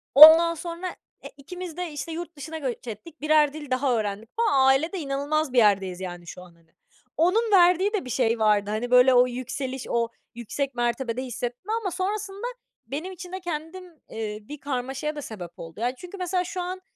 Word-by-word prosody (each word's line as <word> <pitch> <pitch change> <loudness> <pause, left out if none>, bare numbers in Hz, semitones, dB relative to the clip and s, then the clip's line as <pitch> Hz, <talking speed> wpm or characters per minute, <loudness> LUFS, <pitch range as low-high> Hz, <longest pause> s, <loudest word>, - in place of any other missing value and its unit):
Ondan 320 +3 +10
sonra 340 +2 -5 0.4
e, - - -7
ikimiz 355 +3 -8
de, 360 -2 -3
işte, 295 +2 -5
yurt 340 0 -6
dışına 315 +3 -6
göç 260 -5 -5
ettik, 260 +9 -9
1'er 305 -1 +4
dil 295 -3 -9
daha 255 -1 +2
öğrendik 215 0 -3
falan. 280 - +4
Ailede 315 +8 +2
inanılmaz 285 0 -1
bir - - -1
yerdeyiz, 195 -5 +3
yani, 175 -2 -7
şu 180 - -9
an, 175 -2 -15
hani. 165 -1 -29 0.5
Onun 415 +8 +2
verdiği 365 +2 +5
de 405 -10 -1
bir - - -7
şey 235 -2 +1
vardı, 210 -2 +3
hani, 220 +4 -2
böyle, 250 +1 +7
o 250 0 +6
yükseliş, 255 +1 -5
o 235 0 +1 0.3
yüksek 255 +3 -4
mertebede 240 +1 -1
hissetme. 250 - -4
Ama 385 -4 -2
sonrasında 395 +4 -3 0.4
benim 305 +9 -4
için 360 -1 -10
de 375 - -4
kendim, 345 +1 -5
ııı, 335 -4 -20 0.5
bir 295 0 -8
karmaşaya 270 +2 -3
da 295 - -5
sebep 185 - -8
oldu. 165 +3 -9
Yani, 245 +2 0
çünkü 360 +7 -10
mesela, 365 0 0
şu 360 +1 -4
an, 365 +1 -5
285 Hz, 190 wpm, -25 LUFS, 240-350 Hz, 0.5 s, Ondan